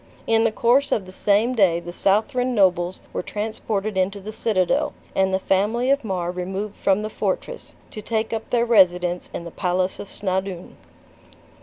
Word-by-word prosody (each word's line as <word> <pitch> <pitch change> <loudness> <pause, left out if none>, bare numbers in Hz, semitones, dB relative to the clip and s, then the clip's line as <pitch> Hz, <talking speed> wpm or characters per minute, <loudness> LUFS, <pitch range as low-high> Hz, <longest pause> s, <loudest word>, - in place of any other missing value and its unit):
In 225 0 +3
the 225 - +3
course 245 +6 +2
of 195 - +1
the 185 - -11
same 210 +6 +2
day 190 -8 +3
the 175 0 -8
Southron 245 +7 +1
nobles 185 -3 +2
were - - -1
transported 215 0 -3
into 190 +2 0
the 205 +2 -7
citadel, 230 - +1 0.2
and 190 0 +2
the 190 - +2
family 210 +7 +1
of 280 -1 +2
Mar 180 -4 -2
removed 190 +3 -4
from 195 +2 +1
the 215 - -3
fortress, - - -3 0.2
to 215 - -7
take 220 +1 -2
up 225 0 -4
their 235 -1 +2
residence 180 -5 +3
in - - -5
the 170 - -8
palace 185 +1 -1
of 200 - -7
Snawdoun. 190 -2 -3
200 Hz, 175 wpm, -23 LUFS, 185-225 Hz, 0.2 s, In